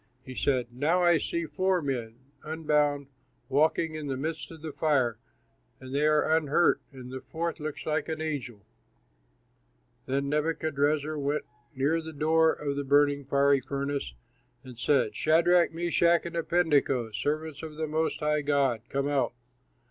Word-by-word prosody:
He 130 - -8
said, 130 -1 +1
"Now 160 +8 +1
I 175 -2 +5
see 170 0 -2
four 185 +2 +1
men, 125 -7 -3 0.3
unbound, 150 -2 0 0.4
walking 155 +3 +2
in 155 -2 -5
the 135 -2 -2
midst 155 +2 -4
of 160 -2 -12
the 160 - -4
fire, 135 -7 +1 0.6
and 130 0 -9
they 145 +2 +2
are 155 +1 +3
unhurt, 160 +2 +2
and 130 -2 -10
the 130 0 -6
fourth 170 +1 -4
looks 155 -1 -5
like 155 +1 -1
an 160 -1 -3
angel." 135 -9 -4 1.4
Then 140 +1 -1
Nebuchadrezzar 150 0 0
went 145 +2 -1 0.3
near 145 +5 +1
the 160 0 -8
door 160 +2 +3
of 140 -1 -3
the 145 - -1
burning, 145 0 +3
fiery 140 0 +3
furnace 140 - -3 0.5
and 125 -3 -12
said, 120 -5 +2
"Shadrach, 170 +4 +4
Meshach, 170 0 +2
and 170 0 -6
Abednego, 150 -8 +1
servants 150 +6 -3
of 155 -1 -8
the 160 +1 -2
Most 155 +1 -1
High 150 0 +1
God, 140 -5 +1
come 140 +1 -1
out." 140 -4 0
150 Hz, 155 wpm, -28 LUFS, 140-160 Hz, 1.4 s, I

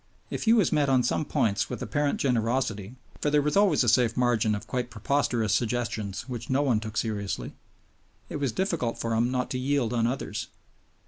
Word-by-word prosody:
If - - -3
he 225 - +6
was 210 -8 +3
met 150 -3 +2
on 130 -2 +4
some 135 +5 0
points 100 -6 0
with - - -4
apparent 145 -1 0
generosity 115 -3 0 0.3
(for 150 - +1
there 145 0 +3
was 150 - 0
always 195 -9 +4
a - - -1
safe 120 -1 +3
margin 120 -3 +2
of 105 - -6
quite 125 -1 -3
preposterous 115 -1 0
suggestions 115 -4 -2
which 120 -3 -6
no 135 +2 +2
one 125 -6 +2
took 110 0 -7
seriously), 105 -3 -2 0.7
it - - -5
was 140 -4 -1
difficult 170 - -1
for 115 0 -2
him 115 +2 +2
not 125 -1 -2
to 130 - -1
yield 130 -3 0
on 115 -1 +2
others. 130 +3 -3
125 Hz, 195 wpm, -27 LUFS, 110-140 Hz, 0.7 s, he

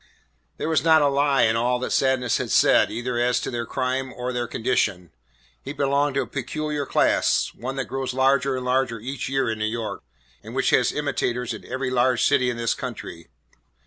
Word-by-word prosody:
There - - -3
was 160 -5 +1
not 160 -2 +5
a - - +4
lie 140 -1 +2
in 110 0 +3
all 120 +2 +1
that 125 - -4
Sadness 130 -3 +2
had - - -4
said - - +4
either 120 +2 -3
as 125 0 +2
to - - -4
their 120 -1 -3
crime 130 +1 -2
or 125 +1 -4
their 120 -1 -2
condition. 100 -8 -1 0.5
He 140 - -6
belonged 140 0 +1
to 140 - +1
a - - -8
peculiar 145 +2 -4
class, - - +2
one 130 +3 -6
that 135 - -2
grows 135 -1 -3
larger 135 +1 +2
and 130 0 -4
larger 125 -2 0
each 130 +4 -5
year 135 -1 0
in 110 -1 -2
New 110 - 0
York 110 0 -4 0.4
and - - -10
which - - +1
has - - +3
imitators 125 0 -2
in 110 - -9
every 130 0 -3
large 125 0 +2
city 135 -3 +3
in 120 - -3
this 115 -1 0
country. 85 0 -7
130 Hz, 205 wpm, -23 LUFS, 120-135 Hz, 0.5 s, not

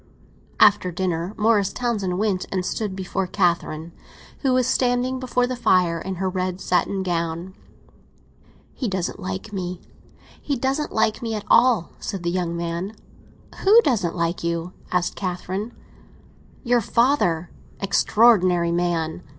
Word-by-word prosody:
After 200 -3 +5
dinner 175 +1 -2
Morris 210 -2 +3
Townsend 210 -7 -1
went 200 -3 0
and 185 -2 -1
stood 205 -2 -3
before 190 0 -2
Catherine, 170 -3 0 0.5
who 270 - +1
was 255 -1 +3
standing 255 +1 +1
before 250 -1 0
the 255 +1 -3
fire 180 -8 +2
in 190 +2 -5
her 190 +2 -2
red 185 0 -2
satin 190 +1 0
gown. 170 0 -2 1.2
"He 255 - -3
doesn't 185 -1 -3
like 190 +3 -5
me—he 185 - -7
doesn't 270 +4 -1
like 220 0 +1
me 225 -2 -2
at 210 - -5
all!" 240 -7 +4
said 195 -3 -5
the 170 - 0
young 175 -2 -2
man. 170 +5 -4 0.6
"Who 420 +4 +7
doesn't 205 - 0
like 170 0 -1
you?" 170 +1 -2 0.2
asked 180 -1 0
Catherine. 190 +3 -4 0.9
"Your 240 -2 +3
father; 205 - +1 0.3
extraordinary 190 -4 +3
man!" 170 -1 -1
190 Hz, 135 wpm, -23 LUFS, 175-225 Hz, 1.2 s, Who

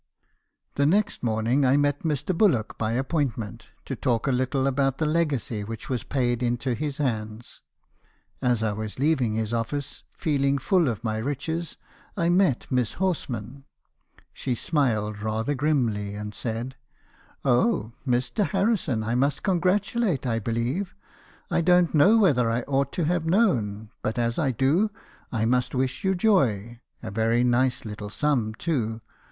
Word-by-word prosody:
"The 140 0 +3
next 205 +5 +1
morning 115 +4 +1
I 130 +1 +4
met 145 0 +1
Mr. 160 +3 -1
Bullock 165 - +2
by 110 0 0
appointment, 130 - -2 0.2
to - - -4
talk 120 -3 0
a 135 - +2
little 130 +1 0
about 135 0 +1
the 160 - 0
legacy 150 -9 0
which 115 +1 -7
was 125 -3 -1
paid 120 -3 0
into 120 +1 0
his 145 +3 -3
hands. 110 -5 -3 0.8
As 120 -3 +1
I 110 -2 0
was 110 0 -5
leaving 135 -5 +1
his 110 0 -2
office, 130 +5 -3
feeling 140 -2 +1
full 170 +4 +2
of 115 -3 -3
my 110 -1 -1
riches, 145 +7 -3 0.4
I 170 0 +2
met 175 -8 +3
Miss 125 -3 +1
Horsman. 135 - -3 0.7
She 125 - -2
smiled 110 -8 0
rather 110 +5 -1
grimly, 120 -9 0
and 105 0 -6
said: 120 +4 -4 0.2
" - - -33
' - - -30
Oh! 125 - +2 0.2
Mr. 125 - +1
Harrison 195 - 0
I 115 +2 -1
must 140 +3 +1
congratulate, 190 - +1
I 115 -2 0
believe. 120 - -2 0.6
I - - +2
don't 180 0 +4
know 190 +9 +6
whether 140 - +3
I 115 +1 0
ought 140 -1 0
to 170 - 0
have 170 0 0
known, 115 - +1
but 110 - -2
as 115 +2 0
1 140 -5 +1
do, 145 - +2 0.4
I 110 -2 0
must 125 +2 +1
wish 130 0 -1
you 190 0 +2
joy. 120 - +1 0.2
A 110 - -5
very 115 +3 +2
nice 125 0 +1
little 105 -1 -6
sum, 120 -3 0
too. 115 -8 -2
130 Hz, 160 wpm, -25 LUFS, 115-155 Hz, 0.8 s, know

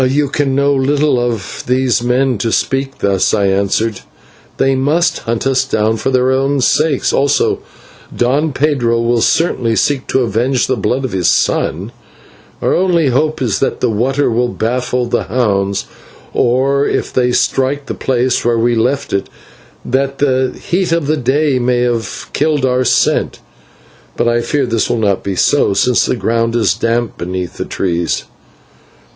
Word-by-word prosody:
"You 145 +1 +1
can 140 -2 0
know 140 +1 +2
little 140 0 +1
of 115 -5 -3
these 125 -2 +1
men 125 -1 +1
to 115 +3 -1
speak 135 +3 -1
thus," 100 0 +1
I 100 -2 +1
answered; 100 +2 0 0.6
"they 135 - +2
must 145 +6 +1
hunt 115 +2 -3
us 135 -1 +2
down 110 -4 0
for 135 - -2
their 130 0 +2
own 135 +1 +1
sakes, 150 +2 +1
also 140 +1 +1 0.5
Don 140 +6 0
Pedro 130 -5 +1
will 115 0 +1
certainly 120 -9 +1
seek 135 +3 0
to 130 - +1
avenge 120 +3 0
the 130 - 0
blood 125 +5 -1
of 130 - -4
his 90 -3 0
son. - - 0 0.7
Our - - +2
only 170 -5 +2
hope 150 +3 0
is 110 -5 0
that 135 - -1
the 125 - +1
water 130 +5 0
will 120 +2 +1
baffle 125 +2 -1
the 120 0 -1
hounds, 100 -5 0 0.5
or 135 +3 +1
that, - - +1
if - - -5
they 125 -1 +2
strike 135 +3 0
the - - -4
place 125 -1 0
where 120 0 +1
we 120 +1 +2
left 125 +5 -1
it, 100 - -1 0.6
the 130 0 0
heat 180 0 -1
of 165 -2 +1
the 155 +2 +1
day 140 +1 +1
may 120 0 +1
have 120 -4 -2
killed 150 -2 +1
our 130 0 +1
scent. - - +1 0.8
But - - +1
I 120 0 +2
fear 145 +3 -1
that 120 - -7
this 115 -1 0
will 120 - 0
not 100 -4 0
be 100 -1 -3
so, 100 0 +2
since 125 +3 +2
the - - 0
ground 115 0 -1
is 115 - +2
damp 115 0 -2
beneath 90 0 -4
the - - -3
trees." 85 -3 -2
125 Hz, 170 wpm, -15 LUFS, 115-135 Hz, 0.8 s, know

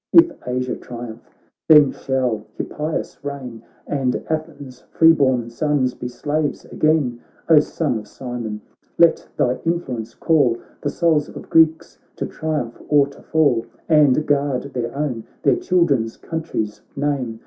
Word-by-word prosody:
If 335 0 +8 0.2
Asia 125 0 -1
triumph, 120 -2 -8 0.5
then 150 -3 +8
shall 125 -5 -1
Hippias 155 0 -4
reign, 130 -5 -6 0.2
And 135 -3 -1
Athens' 145 -5 -5
free 165 0 +6
born 130 -6 +1
sons 135 0 0
be 125 - -6
slaves 145 +4 -2
again! 150 -6 +1 0.3
O 160 -2 +8
Son 150 -5 -1
of 105 - -11
Cimon! 115 -3 -6 0.4
let 170 -1 +4
thy 125 +1 +1
influence 130 -10 -3
call 140 -8 +2 0.2
The 145 - -1
souls 155 -1 +1
of - - -11
Greeks 160 0 +3 0.2
to - - -3
triumph 150 -7 -4
or 145 -2 +5
to 140 - -15
fall! 140 -8 +2 0.2
And 150 -2 +4
guard 140 -3 +1
their 120 +1 -3
own, 130 -6 -2 0.2
their - - +4
children's, 140 -11 +1
country's 155 -10 -4
name. 135 -5 -2
140 Hz, 135 wpm, -21 LUFS, 125-155 Hz, 0.5 s, If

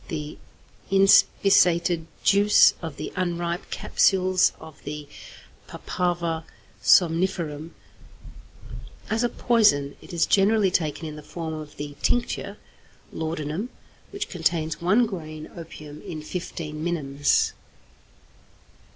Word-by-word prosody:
= - - -24
The 150 -3 -6 0.5
inspissated 180 -3 +4 0.2
juice 205 +1 +6
of 160 -4 -6
the - - -6
unripe 175 0 -2
capsules 185 -1 +2
of 160 -2 -13
the 150 0 -6 0.6
Papaver 170 -2 -2 0.4
somniferum. 165 -3 +2 1.4
As 225 +2 +1
a 240 - +2
poison 205 - +2
it - - -13
is 170 -2 +2
generally 200 0 +3
taken 160 -2 -1
in 155 -1 -7
the - - -8
form 160 +1 -6
of 155 -1 -8
the 145 0 -6
tincture 245 0 -1 0.6
(laudanum), 160 +6 -3 0.4
which 400 0 -5
contains 160 -3 -1
1 205 +8 +4
grain 155 -7 -7
opium 155 -3 -10
in 155 -2 -7
15 155 -2 -6
minims. 145 -5 +1
170 Hz, 110 wpm, -25 LUFS, 155-185 Hz, 1.4 s, juice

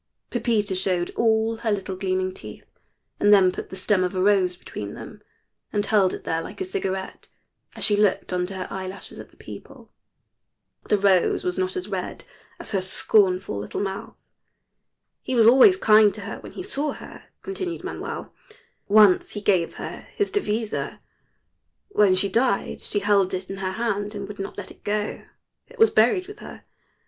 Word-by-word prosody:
Pepita 210 -4 0
showed 185 -2 0
all 225 0 +1
her 225 -1 -1
little 195 -2 -2
gleaming 185 -1 -1
teeth, 105 - -11 0.5
and 205 - +4
then 190 -3 +6
put - - -7
the - - -8
stem 190 0 +1
of 180 +1 -2
a - - -1
rose 190 -2 +3
between 105 - -8
them - - -10 0.5
and 205 0 0
held 200 -3 +3
it - - -7
there 165 0 -1
like - - -9
a 380 - -2
cigarette 190 - -4 0.5
as - - -3
she 210 - +5
looked 205 -2 +1
under 180 +2 -2
her 185 -1 -4
eyelashes 190 0 -7
at - - -10
the - - -25
people. - - -12 1.0
The 210 - +4
rose 195 -3 +3
was 180 +1 -2
not 185 0 -1
as 185 +1 -3
red 190 -3 -5 0.4
as 345 - -4
her 195 -3 +1
scornful 185 - +2
little 105 - -5
mouth. 195 -1 -5 1.0
"He 260 - -3
was 230 -2 +5
always 270 - +7
kind 215 - +6
to 210 - -8
her - - -6
when - - -11
he 370 - -6
saw 295 -6 -2
her," - - -12 0.2
continued 375 -3 -4
Manuel. - - -6 0.5
"Once 205 -2 +5
he 210 - -4
gave 185 -5 +1
her - - -7
his 410 - 0
devisa. 220 - -2 0.9
When 205 - +4
she 190 +2 +2
died 230 +1 0
she 205 - -2
held 200 -2 +2
it 185 +1 -6
in 195 - -5
her 190 -1 -3
hand 210 -1 -2
and 200 -1 -5
would 205 0 -9
not 195 - -6
let 200 -2 -7
it - - -18
go. 210 0 -2 0.4
It - - -17
was 450 0 +5
buried 245 - +3
with 415 - -11
her. - - -11
200 Hz, 180 wpm, -24 LUFS, 185-220 Hz, 1.0 s, always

